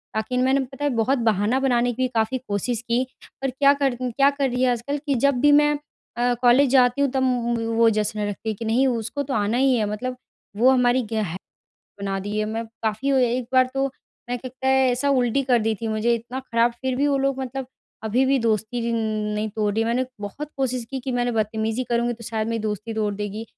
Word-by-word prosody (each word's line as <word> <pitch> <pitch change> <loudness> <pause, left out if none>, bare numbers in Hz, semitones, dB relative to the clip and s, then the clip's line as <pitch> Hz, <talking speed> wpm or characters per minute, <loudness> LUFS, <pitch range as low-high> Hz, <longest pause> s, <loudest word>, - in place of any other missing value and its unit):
बाकी 220 +3 -1
मैंने 265 +2 +3
पता 270 +2 -5
है 290 - +2
बहुत 245 +4 +2
बहाना 225 +2 +1
बनाने 245 -2 +2
की 255 - -5
भी - - +2
काफ़ी 225 +3 +1
कोशिश 210 +3 -2
की 235 +2 +2 0.4
पर 270 - 0
क्या 275 +2 +4
कर 275 -3 0
क्या 255 +3 +3
कर 280 -2 -1
रही 250 +1 -1
है 255 - +4
आजकल 245 +5 -2
कि 280 - +2
जब 280 +3 +2
भी 290 +1 +6
मैं 295 0 +5 0.5
अ, 245 0 +2
कॉलेज 255 +3 +5
जाती 250 0 +4
हूँ 280 - +3
तब 265 -1 0
उम 250 -2 +1
उम, 235 - +1 0.2
वो 230 0 +5
जश्न 215 0 -1
रखती 205 +2 -4
है - - 0
कि 230 - -6
नहीं 245 +5 +2
उसको 235 +3 -2
तो 270 - -4
आना 210 +2 +1
ही 265 0 +3
है 220 -3 +1
मतलब 250 +4 -4 0.4
वो 245 +4 +5
हमारी 250 -1 +3
गेह 215 -7 -1 0.7
बना 195 -1 -2
दिए 210 +2 -2
मैं 225 +2 -3 0.2
काफ़ी 220 +5 -1
अ, 270 - +3
एक 245 -1 +1
बार 255 0 +5
तो 270 0 +1 0.4
मैं 245 - -1
के 255 +1 -7
कै 260 +1 -2 0.2
ऐसा 255 +3 0
उल्टी 255 -1 +2
कर 250 -2 +3
दी 220 0 0
थी 225 - -2
मुझे 220 +2 +1
इतना 240 +3 -6
ख़राब 235 -2 +1
फ़िर 255 +2 -3
भी 280 +3 +1
वो 280 -1 +2
लोग 270 0 0
मतलब 265 0 -5 0.4
अभी-भी 260 +5 +2
दोस्ती 230 +1 -1
जिन 235 0 -1 0.4
नहीं 215 +1 -2
तोड़ 210 -1 -1
रही 225 - +1
मैंने। 245 +3 0 0.2
बहुत 280 +9 -6
कोशिश 255 -3 -1
की 265 - -3
कि 260 +1 -4
मैंने 245 0 0
बदतमीजी 220 +2 -1
करूँगी 240 0 +1
तो 230 0 -12
शायद 220 0 -2
मेरी 230 0 -1
दोस्ती 215 +1 -3
तोड़ 210 -2 -1
देगी। 210 +2 -4
245 Hz, 230 wpm, -23 LUFS, 220-260 Hz, 0.7 s, भी